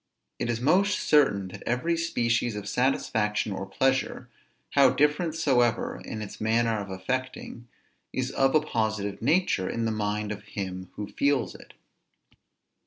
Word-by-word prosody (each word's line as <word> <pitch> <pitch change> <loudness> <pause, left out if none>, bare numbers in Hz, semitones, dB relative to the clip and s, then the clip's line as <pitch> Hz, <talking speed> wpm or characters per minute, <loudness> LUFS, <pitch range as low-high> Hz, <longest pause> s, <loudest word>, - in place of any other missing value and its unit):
It 120 - -2
is 115 -1 0
most 185 +10 +3
certain, 100 -11 +3
that - - -10
every 125 +8 +1
species 120 -8 0
of 105 -1 -6
satisfaction 105 -4 0
or 95 0 -4
pleasure, 130 +6 0 0.4
how 140 -2 +6
different 150 +5 +1
soever 125 -7 +1
in 110 -1 -5
its 100 - -9
manner 115 0 +2
of 100 -1 -6
affecting, 120 +4 -4 0.4
is 130 0 -2
of 135 +1 +2
a 155 - +6
positive 110 -7 -2
nature 140 - +2
in 115 -1 -2
the 110 - 0
mind 105 0 -2
of 105 0 -5
him 95 -3 -6
who 105 - -4
feels 140 +4 0
it. - - -15
115 Hz, 150 wpm, -27 LUFS, 105-135 Hz, 0.4 s, how